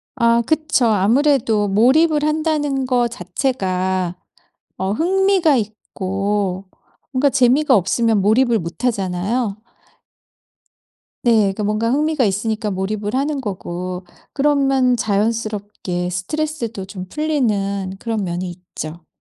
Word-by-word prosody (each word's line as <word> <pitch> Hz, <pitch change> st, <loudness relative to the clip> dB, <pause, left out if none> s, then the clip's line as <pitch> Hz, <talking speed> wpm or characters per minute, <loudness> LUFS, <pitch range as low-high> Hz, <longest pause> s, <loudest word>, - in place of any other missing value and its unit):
아 235 Hz, -2 st, +3 dB
그쵸. 310 Hz, -2 st, +1 dB
아무래도 225 Hz, +1 st, +3 dB
몰입을 295 Hz, +9 st, +3 dB
한다는 300 Hz, -3 st, 0 dB
거 245 Hz, -2 st, +2 dB
자체가 185 Hz, -4 st, -2 dB, 0.6 s
어 190 Hz, +1 st, -1 dB
흥미가 370 Hz, -, +3 dB
있고 195 Hz, -2 st, -2 dB, 0.5 s
뭔가 275 Hz, +2 st, +2 dB
재미가 265 Hz, +2 st, +4 dB
없으면 220 Hz, +3 st, +2 dB
몰입을 230 Hz, +3 st, +3 dB
못 170 Hz, +7 st, -7 dB
하잖아요. 200 Hz, +1 st, -1 dB, 1.7 s
네 230 Hz, -3 st, +4 dB
그니까 195 Hz, +2 st, -2 dB
뭔가 215 Hz, +2 st, 0 dB
흥미가 300 Hz, -1 st, +1 dB
있으니까 215 Hz, +2 st, -1 dB
몰입을 205 Hz, +3 st, -3 dB
하는 280 Hz, +1 st, -1 dB
거고 180 Hz, -3 st, -5 dB, 0.3 s
그러면 270 Hz, -3 st, +2 dB
자연스럽게 210 Hz, -4 st, -2 dB
스트레스도 230 Hz, -, -3 dB
좀 190 Hz, -2 st, -8 dB
풀리는 205 Hz, -11 st, -1 dB
그런 225 Hz, -3 st, -2 dB
면이 175 Hz, 0 st, -3 dB
있죠. 170 Hz, -2 st, -9 dB
220 Hz, 255 characters per minute, -19 LUFS, 195-270 Hz, 1.7 s, 재미가